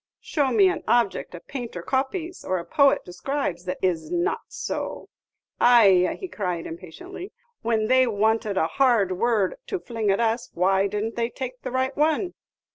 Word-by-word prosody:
Show 285 -4 0
me 205 -5 +5
an 175 - -1
object 235 -6 +1
a - - -7
painter 235 -5 -7
copies, 315 - -2
or 185 - -1
a 170 - -5
poet 280 -1 +3
describes, 185 -2 -3
that 180 0 -3
is 180 - 0
n't 350 +3 0
so!' - - -5 0.5
Ayeh," 210 - +5
cried 180 -5 -3
he, - - -5
impatiently, 270 - -9 0.3
"when 225 -1 +1
they 255 +2 +4
wanted 215 -1 +1
a 160 - +3
hard 225 0 +2
word 215 - +1
to 390 - -2
fling 225 -8 -3
at 195 - +2
us, 230 +1 0
why 190 +2 +3
didn't 210 +3 -3
they 235 0 0
take 255 -1 -6
the - - -4
right 260 +1 -1
one?" 315 +5 +1
225 Hz, 170 wpm, -24 LUFS, 190-265 Hz, 0.5 s, me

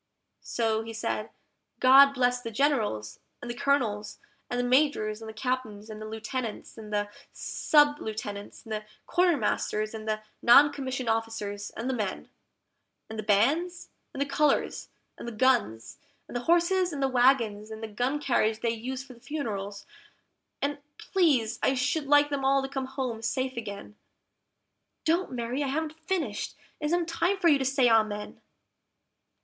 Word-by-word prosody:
So 220 -2 0
he 225 0 -7
said, 220 - -3 0.5
"GOD 275 +2 +7
bless 250 -1 +2
the 230 - -5
Generals, 215 - 0 0.2
and 240 - -5
the - - -6
Colonels, 235 -7 0 0.3
and 245 - -1
the - - +1
Majors, 245 -5 +2
and 220 - -7
the - - -5
Captains, 220 -2 -3
and 215 0 -8
the 215 - -6
Lieutenants, 220 +1 -5
and 215 -2 -10
the 205 0 0 0.3
Sub 295 -1 +3
lieutenants, 205 -2 -6
and 225 - -12
the 215 0 -3 0.2
Quartermasters, 265 -10 +1
and 220 -1 -7
the 215 0 -1 0.2
non 285 +5 +7
commissioned 260 -3 -4
officers, 225 -3 -2
and 230 - -3
the 265 - 0
men; 210 -6 -3 0.8
And 220 - -6
the - - 0
bands, 285 - +1 0.2
and - - -8
the 280 - +2
colours, 285 +1 +1 0.3
and - - -7
the - - -3
guns, 225 - +1 0.3
and - - -10
the 245 0 -3
horses 350 +2 +3
and 280 -3 -3
the - - +4
wagons, 240 -5 +2
and 220 0 -8
the - - -3
gun 245 +7 -1
carriage 225 -6 +1
they 230 - +1
use 255 +4 -5
for 265 -2 -13
the 235 - -18
funerals; 205 -9 -5 0.8
and 290 +1 -1 0.2
please 265 - +1
I 265 - +2
should 285 +3 0
like 290 0 +5
them 280 -1 -1
all 270 0 +3
to - - -2
come 270 -1 -3
home 260 -4 -4
safe 260 +3 -1
again. 210 -2 -7 1.1
(Don't, 340 +4 +1
Mary! 245 +2 -3
I 285 - 0
haven't 310 +3 -2
finished; 370 +1 -2 0.2
it 300 - -4
isn't 340 +1 +1
time 345 +3 0
for 345 -3 +4
you 285 -3 +5
to - - 0
say 265 -1 +3
Amen.) 215 -2 +1
245 Hz, 170 wpm, -28 LUFS, 220-280 Hz, 1.1 s, GOD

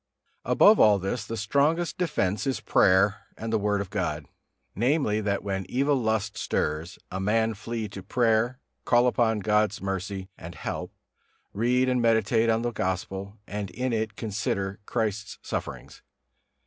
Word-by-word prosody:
Above 210 +1 +6
all 105 -2 +6
this, 100 +4 -3
the 115 +1 -5
strongest 145 +10 +1
defence 105 - -1
is 135 - 0
prayer 100 +2 +3
and 115 0 -4
the 110 - +3
Word 105 0 +1
of 100 -2 -7
God; 85 -7 -2 0.5
namely, 120 - +1
that 100 -1 -1
when 95 -1 -2
evil 140 +3 +2
lust 110 -4 0
stirs, 80 +4 -2
a 95 - -3
man 110 +3 +1
flee 115 +1 -4
to 100 -1 -8
prayer, 115 +4 +1 0.3
call 120 0 +4
upon 115 -3 +2
God's 105 +1 +2
mercy 95 0 -4
and 85 +1 -9
help, - - -5 0.6
read 125 +4 +2
and 125 -1 +2
meditate 115 0 +3
on 115 +1 +2
the 120 - 0
Gospel, 95 +1 -3
and 100 0 -4
in 125 0 -2
it 110 -1 -1
consider 100 -2 -2
Christ's 105 -3 -2
sufferings. - - -6
110 Hz, 150 wpm, -26 LUFS, 100-120 Hz, 0.6 s, Above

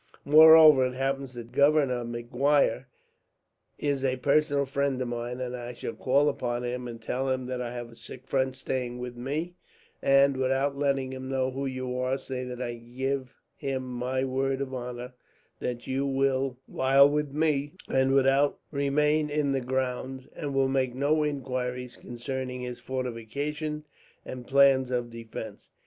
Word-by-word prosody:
"Moreover, 155 -2 +8
it 125 - -6
happens 135 -1 -2
that 120 0 -8
Governor 140 -2 +3
Maguire 125 +4 +1 0.9
is 140 -2 -1
a 130 -1 +1
personal 145 +1 +2
friend 140 -1 -1
of 130 - -2
mine, 120 +1 -4
and 125 -1 -3
I 120 0 -6
shall 115 - -5
call 140 +3 +2
upon 120 -4 -1
him 125 0 -3
and 115 -1 -7
tell 130 +4 -2
him 130 -1 -1
that 125 0 -3
I 120 -1 -4
have 120 -1 -6
a - - -15
sick 120 +3 -11
friend 130 -1 0
staying 125 -2 -3
with 125 0 -6
me 155 +8 -4 0.4
and, 135 0 +4
without 135 +2 +1
letting 135 -2 0
him 130 0 -6
know 130 -1 0
who 135 +1 -3
you 130 -1 -4
are, 130 +1 0
say 130 -2 -5
that 125 -1 -6
I 120 -2 -4
give 130 +2 -4 0.2
him 135 -1 -3
my 130 +1 -2
word 135 0 -1
of 135 -1 -4
honour 125 0 -6 0.5
that 120 -1 -4
you 135 +1 -1
will, 135 -1 0
while 135 +1 +5
with 150 0 -1
me, 150 0 0
remain 140 +2 +2
in 145 -1 0
the 135 -1 0
grounds, 130 +1 -3
and 140 -2 -4
will 135 -1 +3
make 130 -2 0
no 150 +3 +2
inquiries 125 -3 -3
concerning 125 +1 -5
his 125 -1 -5
fortifications 140 +5 -4 0.4
and 125 -1 -8
plans 135 -1 +5
of 120 -2 -2
defence. 110 -2 -8
130 Hz, 160 wpm, -28 LUFS, 125-140 Hz, 0.9 s, Moreover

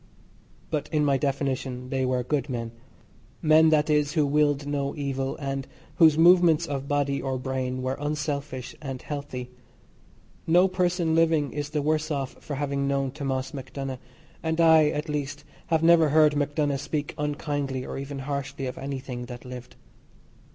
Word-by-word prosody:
But 150 -2 -2
in 150 -2 +2
my 140 -2 +2
definition 130 -2 -2
they 135 -1 0
were 125 -1 0
good 140 +1 -1
men 115 -2 -3 0.7
men, 160 0 +5
that 150 -1 +3
is, 150 -1 +2
who 155 -3 +3
willed 145 0 +2
no 140 -1 -2
evil, 135 -2 -2
and 135 -2 -4 0.3
whose 160 -3 +6
movements 170 -1 +6
of 140 -3 -4
body 140 -1 0
or 130 -1 -2
brain 130 0 -3
were 130 +1 -1
unselfish 145 -3 -3
and 135 -3 -5
healthy. 130 -4 -6 1.0
No 175 +3 +5
person 180 -3 0
living 160 -3 +2
is 145 -1 -3
the 150 -2 -1
worse 155 +1 0
off 140 -4 -2
for 145 - -4
having 140 0 -1
known 135 -1 0
Thomas 135 -2 -3
MacDonagh, 135 -1 -5 0.4
and 160 0 -1
I, 160 -2 +6
at 150 +2 -3
least, 145 -1 -3 0.2
have 160 -1 +1
never 165 -2 +6
heard 150 0 +5
MacDonagh 145 -1 0
speak 145 0 -3
unkindly 145 -3 -2
or - - -5
even 140 +1 -6
harshly 140 -1 -3
of 125 - -5
anything 130 -3 -5
that 125 +1 -9
lived. 125 -1 -9
145 Hz, 160 wpm, -26 LUFS, 135-150 Hz, 1.0 s, whose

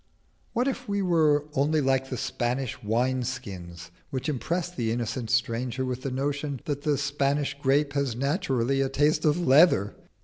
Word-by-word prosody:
What 245 +3 +1
if 255 -3 -3
we 200 -1 0
were 155 -5 +3
only 150 +3 +2
like 135 -1 +1
the 130 - -3
Spanish 125 +2 -2
wine 125 +4 0
skins 90 -6 -6 0.2
which 130 0 -3
impress 170 +5 -2
the 120 -9 -2
innocent 115 0 -3
stranger 125 +1 0
with 125 0 -3
the 135 - -3
notion 140 +1 -2
that 145 -1 -2
the 150 -2 +1
Spanish 140 0 0
grape 140 +1 +2
has 140 -5 0
naturally 135 -1 0
a 135 - +1
taste 145 +4 +2
of 150 +2 +3
leather? 140 - +4
135 Hz, 165 wpm, -27 LUFS, 125-150 Hz, 0.2 s, leather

